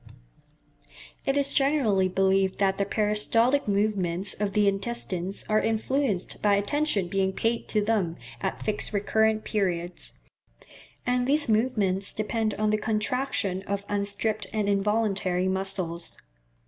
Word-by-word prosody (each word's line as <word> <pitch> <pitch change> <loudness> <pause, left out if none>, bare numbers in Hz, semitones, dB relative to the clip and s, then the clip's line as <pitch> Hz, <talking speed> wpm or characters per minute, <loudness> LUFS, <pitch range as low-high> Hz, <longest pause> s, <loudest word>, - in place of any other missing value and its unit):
It 275 +1 +2
is 280 0 +2
generally 270 -10 +2
believed 190 0 +2
that 195 -1 +1
the 200 - +1
peristaltic 225 +6 +2
movements 200 -3 0
of 205 -1 -2
the 210 -1 +3
intestines 195 -2 -2
are 215 0 +3
influenced 225 -2 -1
by 205 -1 +4
attention 205 - 0
being 190 +1 0
paid 230 +4 -1
to 210 -1 +1
them 200 -7 0 0.3
at - - -3
fixed 215 0 0
recurrent 220 +1 +1
periods; 180 -4 -2 0.9
and 250 0 +1
these 295 +2 +3
movements 215 -4 +1
depend 215 0 -1
on 215 0 +1
the 215 - +1
contraction 215 -3 -1
of 200 0 -2
unstriped 205 +1 -2
and 210 -2 -1
involuntary 200 -3 +1
muscles. 185 -3 -2
205 Hz, 125 wpm, -26 LUFS, 195-225 Hz, 0.9 s, by